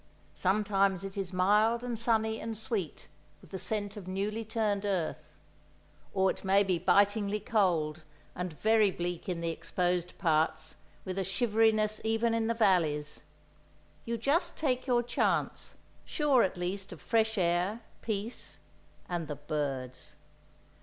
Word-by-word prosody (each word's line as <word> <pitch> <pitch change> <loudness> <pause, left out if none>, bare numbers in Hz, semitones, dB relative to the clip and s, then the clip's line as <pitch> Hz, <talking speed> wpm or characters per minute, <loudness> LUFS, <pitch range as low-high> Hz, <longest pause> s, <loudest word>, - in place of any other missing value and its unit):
Sometimes 195 -1 +1
it 195 0 -6
is 195 -2 -3
mild 210 +6 +3
and 240 -3 -3
sunny 220 -1 +1
and 225 -1 -4
sweet 215 -7 -3 0.3
with - - -18
the 190 - -4
scent 205 0 -2
of 200 -4 -8
newly 205 +4 -2
turned 215 -2 -1
earth; 185 -6 -2 0.8
or 190 -1 +3
it - - -9
may 195 +1 +4
be 185 -3 0
bitingly 200 +3 +3
cold, 175 -8 +1 0.3
and 180 0 -4
very 215 +6 +3
bleak 175 0 -4
in 170 -2 -2
the 165 0 -1
exposed 180 +1 -1
parts, 160 -1 +1 0.3
with 185 +1 -3
a - - +1
shivery 220 +3 +3
ness 215 0 -1
even 225 +1 +1
in 225 -1 +1
the 230 - 0
valleys. 160 -9 +1 0.8
You 235 0 -2
just 280 - +1
take 260 -4 0
your 240 -1 +3
chance, 240 - -1 0.3
sure, 290 -5 +3
at 185 - 0
least, 190 +3 -3
of 175 - -9
fresh 220 -1 +1
air, 180 +5 +1 0.2
peace—and 200 -5 -6
the 150 - -4
birds. 140 -4 -4
200 Hz, 145 wpm, -31 LUFS, 180-220 Hz, 0.8 s, may